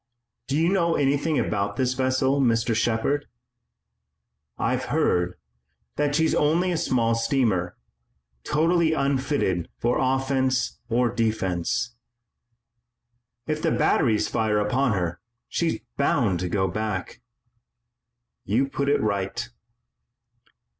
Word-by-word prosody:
Do 140 +2 0
you 165 +2 +3
know 170 -3 +2
anything 145 +2 +1
about 100 -1 -1
this 130 -1 +1
vessel, 130 +1 +1
Mr. 115 -2 +2
Shepard?" 120 +6 0 1.3
"I've - - -1
heard 90 0 +1 0.6
that 145 -1 0
she's 160 +1 +2
only 165 +5 +2
a 170 - 0
small 115 -6 +1
steamer, 115 -7 0 0.7
totally 165 +1 +2
unfitted 135 - 0
for 120 +1 0
offense 130 -1 0
or 120 0 +2
defense." 110 -2 -1 1.5
"If 155 0 -2
the 165 - +1
batteries 115 -8 +2
fire 110 -1 0
upon 120 +4 +1
her 90 -2 -2 0.3
she's 165 -2 -1 0.2
bound 125 - +1
to 90 0 -2
go 95 0 +1
back." 100 -1 -4 1.2
"You 120 +7 +1
put 140 +1 -1
it 145 - +3
right." 100 +3 -2
125 Hz, 110 wpm, -25 LUFS, 105-145 Hz, 1.5 s, you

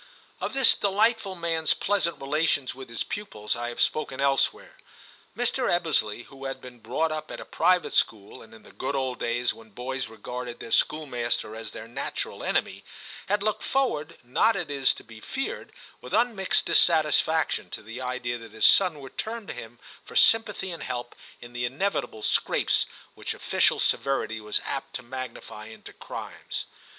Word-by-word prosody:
* - - -30
Of - - -2
this 270 -2 +7
delightful 205 0 +2
man's 165 -2 +1
pleasant 195 -4 +1
relations 145 -1 +1
with 130 -1 -10
his 115 - -2
pupils 105 - -3
I 120 0 -3
have 120 - +2
spoken 145 -4 -1
elsewhere. 140 - +2 0.6
Mr. 245 +1 +1
Ebbesley, 155 -10 +1
who 135 -1 -11
had 135 - -3
been 125 -1 -11
brought 130 +9 0
up 155 0 -4
at - - -6
a - - -7
private 180 +1 +2
school, 105 -3 +1
and 110 - -14
in 110 - -14
the - - -15
good 140 +2 -3
old 130 -2 -1
days 120 +1 +1
when 115 0 -15
boys 125 +4 -3
regarded 120 +2 -6
their 115 - -8
schoolmaster 120 -7 +1
as 110 -1 -6
their 110 - -8
natural 120 - -4
enemy, - - 0 0.4
had 205 +1 +1
looked 215 0 0
forward, 165 - 0
not, 215 - +3
it 175 -6 -3
is 140 -2 +3
to - - -11
be 115 -1 -12
feared, 270 - -4 0.3
with - - -2
unmixed 230 -6 +2
dissatisfaction, 160 0 +3
to - - -7
the 115 +4 -7
idea 125 -1 -2
that 115 -2 -12
his 110 - +3
son 180 -7 +6
would 135 - -10
turn 225 0 -3
to - - -5
him 115 +2 -9 0.3
for - - -12
sympathy 210 -4 +4
and 170 - -6
help 120 -1 -4 0.3
in 120 0 -10
the 120 0 -2
inevitable 130 - -1
scrapes - - +2 0.3
which - - -4
official - - +3
severity 135 -5 +1
was 105 0 -1
apt 135 0 -4
to - - -4
magnify 120 -3 -7
into 110 - -11
crimes. - - -6
135 Hz, 175 wpm, -27 LUFS, 120-175 Hz, 0.6 s, this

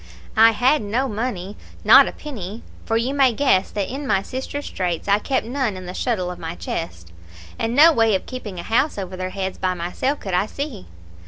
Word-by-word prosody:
I 225 0 +7
had 255 +6 +3
no 230 +6 -1
money 210 -4 -4 0.3
not - - +8
a - - -3
penny 220 -7 -7 0.2
for 225 - +2
you 245 +4 -1
may 270 -3 +4
guess 215 -7 +2
that 200 -2 -2
in 275 +2 -5
my 195 -3 +2
sister's 265 +4 -5
straits 175 -2 -3
I 200 +1 +4
kept 260 +1 -1
none 240 -5 -2
in 185 - -8
the 180 - -6
shuttle 185 -6 -1
of 180 - -9
my 165 +1 -5
chest, 85 - -6 0.5
and 225 +1 -1
no 320 +4 +8
way 225 -5 +3
of 190 - -3
keeping 220 -7 -7
a 170 - -5
house 245 - +1
over 190 -2 -5
their 185 0 -4
heads 190 0 -4
by 185 -1 0
myself 180 +11 -2
could 190 - -5
I 185 +4 +2
see. 280 -5 -6
215 Hz, 215 wpm, -22 LUFS, 185-255 Hz, 0.5 s, not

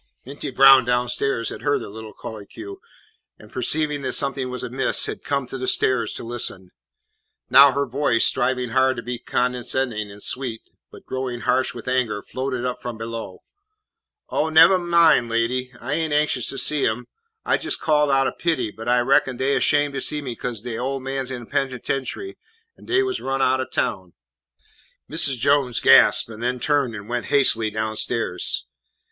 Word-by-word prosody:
Minty 140 +2 -7
Brown 135 0 +7
downstairs 125 0 -1
had - - -8
heard 145 - +1
the - - -8
little 110 +1 -9
colloquy, 110 - -9 0.6
and, - - -16
perceiving 150 -2 0
that 130 -2 -2
something 135 -2 0
was 125 0 -5
amiss, 130 +3 0
had - - -6
come 140 -2 -1
to 130 +1 -7
the 130 - -4
stairs 130 -2 +1
to - - -7
listen. 115 -6 -4 0.8
Now 140 0 +8
her 140 +1 0
voice, 130 -2 +1
striving 125 -1 0
hard 130 +1 +2
to 120 - -5
be 120 -1 -5
condescending 125 -3 -2
and 100 0 -9
sweet, 125 -4 -3 0.3
but - - -14
growing 130 -2 -4
harsh 130 +1 0
with - - -9
anger, 125 -5 -1
floated 130 -1 -4
up 125 -1 -4
from 120 -2 -6
below: 115 -4 -7 0.9
"Oh, 160 - 0
nevah 160 +4 +6
min', 170 -8 +4
lady, 125 +2 -1
I 130 +5 -4
ain't 160 -1 -1
anxious 150 +1 +1
to 135 - -4
see 150 +1 +2
'em. 110 +3 -3 0.4
I - - +2
jest - - -2
called 150 -2 +2
out 135 -1 +3
o' - - 0
pity, 160 -10 -1
but 110 +3 -7
I 125 0 +3
reckon 130 0 +2
dey 135 +2 +1
'shamed 145 -1 +2
to 135 - -3
see 150 - 0
me 125 -4 -5
'cause 115 -2 -5
de 120 -1 -5
ol' 135 +2 -2
man 135 0 -4
's - - -6
in 125 -2 -6
penitentiary 135 - -3 0.4
an' - - -18
dey 380 +1 +2
was 385 -1 -3
run 135 0 -2
out 130 0 +2
o' - - -3
town." 95 -8 -3 0.9
Mrs. 135 -3 +2
Jones 135 -1 +2
gasped, - - +5
and 110 0 -10
then 125 +1 -1
turned 140 -3 0
and 100 0 -9
went 120 0 -3
hastily 115 -6 +3
downstairs. 110 0 -1
130 Hz, 180 wpm, -22 LUFS, 120-140 Hz, 0.9 s, Now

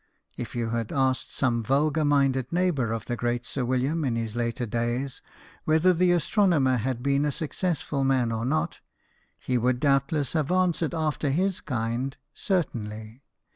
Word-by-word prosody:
If 120 - -6
you 115 -1 -1
had 115 -2 -2
asked 130 -1 0
some 120 -4 +1
vulgar 145 +6 +1
minded 135 -3 +2
neighbour 170 -10 +1
of 115 -2 -3
the 120 - -2
great 120 0 -2
Sir 135 - -3
William 130 +6 0
in 125 -5 0
his 115 -1 -3
later 120 +1 -1
days 120 +4 -2 0.4
whether 160 +4 +4
the 180 +1 +3
astronomer 170 - +3
had 125 +1 -2
been 140 +1 +2
a 150 - +1
successful 155 -2 -2
man 130 -3 +2
or 115 0 -2
not, 145 +6 -1 0.6
he 125 -1 -1
would 125 +1 +1
doubtless 140 0 +1
have 155 -1 0
answered, 175 -3 +1
after 155 -2 0
his 185 +6 0
kind, 120 +2 -2 0.2
"Certainly. 110 - -3
135 Hz, 160 wpm, -26 LUFS, 120-155 Hz, 0.6 s, whether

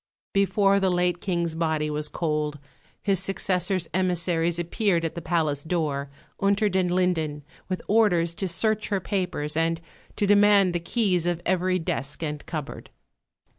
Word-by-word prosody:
Before 200 0 +3
the 190 -1 +2
late 180 -1 +1
King's 170 -3 -1
body 160 -2 0
was 150 0 -2
cold, 150 -3 -2 0.5
his 195 -3 +3
successor's 185 -2 +1
emissaries 175 -2 +1
appeared 175 0 0
at 165 - -3
the 170 - -6
palace 160 -4 0
door, 150 -5 -2 0.3
Unter 200 +2 +2
den 185 -1 +1
Linden, 170 -5 0 0.3
with 185 - -3
orders 185 -6 +3
to 190 +3 -2
search 215 +4 0
her 200 -2 0
papers 180 -6 -2
and 165 0 +1 0.4
to 205 - +1
demand 205 -2 +5
the 175 - 0
keys 180 -1 0
of 175 -1 0
every 185 0 +1
desk 150 -3 -3
and 150 -1 -4
cupboard. 155 -4 -6
175 Hz, 150 wpm, -25 LUFS, 160-195 Hz, 0.5 s, demand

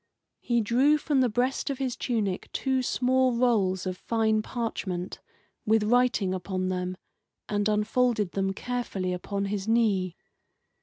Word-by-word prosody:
He 235 -1 +1
drew 260 +8 +3
from 295 -3 +1
the 250 - +3
breast 250 +6 0
of 275 - -2
his 260 -2 -2
tunic 210 -7 -2
two 265 -1 0
small 255 0 +2
rolls 210 -7 +1
of 185 -1 -3
fine 220 -1 +1
parchment, 200 -6 -4 0.4
with 220 0 +3
writing 240 -4 +2
upon 185 0 -2
them, 180 0 -3 0.5
and 205 0 0
unfolded 215 -1 +1
them 195 0 0
carefully 195 -5 -3
upon 200 +2 -3
his 200 0 -3
knee. 205 -6 +2
215 Hz, 140 wpm, -27 LUFS, 190-245 Hz, 0.5 s, drew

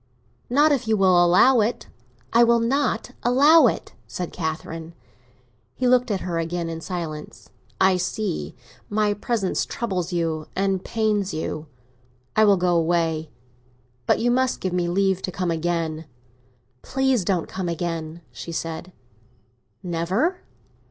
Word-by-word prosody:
Not 295 +5 +4
if 270 -5 0
you 220 -1 +2
will 185 -2 +5
allow 205 +9 +5
it." 220 +3 -1 0.5
"I 235 +1 +6
will 235 0 +4
not 235 0 0
allow 285 +7 +6
it!" - - -3
said 180 -2 -5
Catherine. 165 0 -5 0.8
He 255 - 0
looked 250 -1 +3
at 200 -3 -1
her 170 -2 -2
again 165 0 -3
in 165 0 -5
silence. 155 - -6 0.3
"I 190 -1 +4
see; 185 0 -3 0.3
my 210 0 +1
presence 205 -2 -1
troubles 185 -6 -3
you 165 -3 -2
and 195 -1 0
pains 210 -4 0
you. 155 0 -4 0.7
I 215 - +5
will 200 -2 +5
go 175 -1 +1
away; 165 -1 +1 0.8
but - - +4
you 240 +1 +1
must 260 +1 +1
give 185 -1 -3
me 175 -1 0
leave 190 +1 +1
to 185 - -4
come 180 -1 -2
again." 165 -1 -2 0.8
"Please 265 -5 +1
don't 180 -3 0
come 185 -2 -4
again," 165 -1 -4
she 170 - -8
said. 165 +2 -5 0.9
"Never? 185 - 0
185 Hz, 140 wpm, -23 LUFS, 165-220 Hz, 0.9 s, I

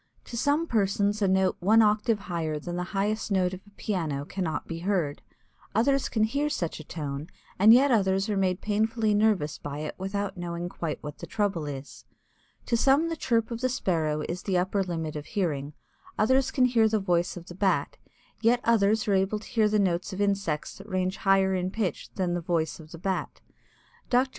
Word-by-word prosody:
To - - -8
some 285 +7 +2
persons 205 -4 +1
a 200 - +3
note 190 0 +2
one 220 +5 +5
octave 215 0 +2
higher 165 -5 -2
than 175 +4 -5
the 180 0 -2
highest 215 +2 -1
note 185 -1 +2
of 185 - -7
a - - -15
piano, 165 -9 -3
cannot 165 -3 -3
be 165 -1 -5
heard. 175 -6 -1 0.5
Others 275 +5 +2
can 220 - +1
hear 280 +7 0
such 170 - -3
a - - -8
tone, 145 -1 -5 0.3
and 210 +3 +8
yet 265 +4 +6
others 195 -3 +2
are 210 - 0
made 185 -1 0
painfully 220 +1 +1
nervous 205 -8 +2
by 145 -1 -6
it 155 - -4
without 195 0 -3
knowing 175 0 -4
quite 165 -4 -4
what 150 0 -7
the - - -7
trouble 195 -8 -1
is. 140 -1 -8 0.6
To 235 - +1
some 275 +7 +3
the 330 - -2
chirp 230 -6 0
of 235 0 -4
the 255 - +1
Sparrow 160 -10 0
is 175 +2 -4
the 190 -3 0
upper 185 +3 +1
limit 165 -4 -3
of 150 -1 -6
hearing, 150 -8 -2 0.4
others 260 +5 +3
can 255 - +3
hear 235 -3 +4
the 220 - +2
voice 175 -2 0
of 170 - -9
the 175 - -10
Bat, 190 +1 0 0.4
yet 235 +2 +4
others 220 -1 +3
are 205 - +3
able 195 +2 +2
to 210 - -11
hear 220 -3 +2
the 210 - +2
notes 185 -1 0
of 190 - -6
insects 195 -7 -1
that 200 +2 -12
range 185 +1 -1
higher 195 -1 +3
in 185 0 -1
pitch 195 -5 -3
than 185 -3 0
the 175 - -1
voice 165 -2 -1
of 155 -1 -12
the 165 - -8
Bat. 185 +1 -3 0.7
Dr. 255 +2 +3
195 Hz, 205 wpm, -27 LUFS, 175-220 Hz, 0.7 s, and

